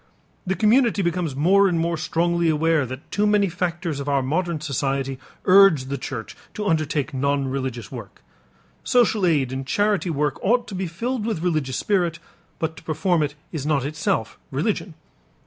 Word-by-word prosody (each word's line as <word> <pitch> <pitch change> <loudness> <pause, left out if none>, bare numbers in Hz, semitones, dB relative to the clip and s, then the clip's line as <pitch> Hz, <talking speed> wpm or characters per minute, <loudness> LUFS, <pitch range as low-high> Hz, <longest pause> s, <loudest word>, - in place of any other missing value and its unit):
The 190 - +1
community 225 -1 +3
becomes 170 -4 -1
more 195 +7 +4
and 175 -3 +1
more 170 +1 0
strongly 170 +1 0
aware 155 -2 +2
that 130 +3 -9
too 210 +1 +1
many 205 -2 +3
factors 170 -3 -2
of 140 +1 -3
our 140 -2 +2
modern 165 +4 -1
society 135 -2 -2 0.3
urge 185 -8 +6
the 140 - -2
church 125 -4 -6 0.2
to 210 - -3
undertake 155 -4 0
non 140 +1 0
religious 130 -5 -4
work. - - -10 0.6
Social 220 -6 +3
aid 140 -6 +2
and 135 +1 -3
charity 200 +4 +1
work 150 -3 -1
ought 240 +4 +2
to - - -8
be 190 -1 -2
filled 230 +8 -3
with 215 -7 -2
religious 155 -7 0
spirit, 175 -5 0 0.4
but 160 0 -2
to - - -12
perform 160 +2 +1
it 145 -1 -1 0.2
is 155 -5 -4
not 145 -3 +1
itself 150 +2 -2
religion. - - -2
165 Hz, 170 wpm, -23 LUFS, 140-190 Hz, 0.6 s, urge